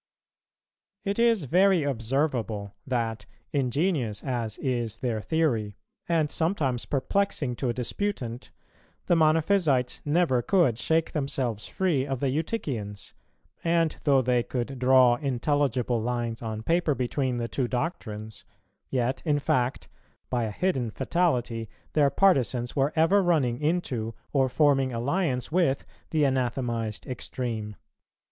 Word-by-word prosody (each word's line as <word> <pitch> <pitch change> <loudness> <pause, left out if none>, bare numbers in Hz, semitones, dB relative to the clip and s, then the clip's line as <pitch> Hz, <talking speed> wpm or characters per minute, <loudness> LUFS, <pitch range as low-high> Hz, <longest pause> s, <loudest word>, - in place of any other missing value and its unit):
It 200 +2 -1
is 230 -6 +4
very 180 +4 +4
observable 115 -5 -1
that, 115 -4 -2 0.3
ingenious 135 - 0
as 120 -5 -3
is 120 -5 -2
their 115 -3 -2
theory 115 - 0 0.3
and 160 -3 +2
sometimes 155 -8 0
perplexing 145 -2 0
to 130 - -1
a - - 0
disputant, 125 - -3 0.6
the 175 - +3
Monophysites 155 -4 +2
never 145 -5 +2
could 145 - +2
shake 160 0 +1
themselves 130 -7 -2
free 160 -8 0
of 135 -2 -2
the 140 - +1
Eutychians; 125 - -3 0.5
and 165 -1 +2
though 135 -3 +4
they 125 0 +2
could 125 +2 -4
draw 125 -1 +5
intelligible 130 -3 0
lines 120 -1 -2
on 110 -1 -4
paper 165 0 +2
between 130 0 -1
the 120 -1 -2
two 125 +1 -1
doctrines, 110 - -4 0.5
yet 130 0 0
in 150 -3 +2
fact 130 -3 0 0.4
by 120 -2 +1
a 110 - -3
hidden 130 - 0
fatality 120 - 0 0.2
their 145 -2 +4
partisans 130 -8 +2
were 140 +1 +2
ever 165 +6 +4
running 145 -10 +1
into 135 -9 -1 0.2
or 135 -2 +3
forming 135 -1 +3
alliance 130 +3 -1
with 160 -6 +1 0.2
the 155 -2 +1
anathematized 120 -4 -1
extreme. 120 -4 -4
130 Hz, 125 wpm, -27 LUFS, 120-155 Hz, 0.6 s, draw